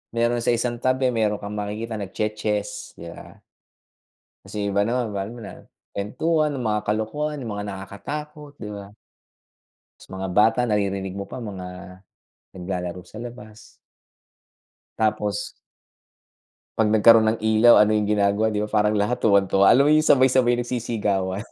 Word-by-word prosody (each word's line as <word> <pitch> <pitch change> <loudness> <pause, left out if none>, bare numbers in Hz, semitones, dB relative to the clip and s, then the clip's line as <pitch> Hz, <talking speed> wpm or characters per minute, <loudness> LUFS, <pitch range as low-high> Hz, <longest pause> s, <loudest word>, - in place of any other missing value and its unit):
meron 120 +1 +1
sa - - -6
isang 120 0 -2
tabi 130 0 +2
meron 110 -3 +1
kang 100 - -6
makikita 105 +2 -4
nagche-chess, 105 +1 -3
'di 85 - -10
ba? - - -13 1.0
Tas - - -14
yung 100 0 -1
iba 100 - +3
naman, 115 -1 -2
ma 100 - -1
alam 105 +4 -8
mo 120 - -10
na, 100 - -8 0.4
kuwentuhan 150 +10 0
ng 125 - -4
mga 105 0 0
kalokohan, 145 +8 -2
yung 115 -4 -5
mga 105 - -4
nakakatakot, 145 +10 -7
'di 105 - -7
ba? 100 0 -10 1.1
Tas - - -16
mga 95 0 -5
bata 110 +5 +3
naririnig 100 -4 -1
mo 100 +1 -6
pa, 125 - -7
mga 90 -2 -8 0.5
naglalaro 90 -1 -5
sa - - -16
labas. 110 -3 -11 1.3
Tapos 105 -2 -1 1.2
'pag 110 -1 +3
nagkaroon 110 +1 +6
ng - - -7
ilaw, 110 +2 +6
ano 105 0 +3
yung 105 -1 0
ginagawa 105 +1 +2
'di 105 - -1
ba, - - -10
parang 105 0 +2
lahat 105 +4 0
tuwang-tuwa. 100 -2 +4
Alam 140 +4 +5
mo - - +4
yung 155 0 +3
sabay-sabay 130 -3 +4
nagsisigawan, 105 -5 -2
105 Hz, 155 wpm, -23 LUFS, 100-120 Hz, 1.3 s, nagkaroon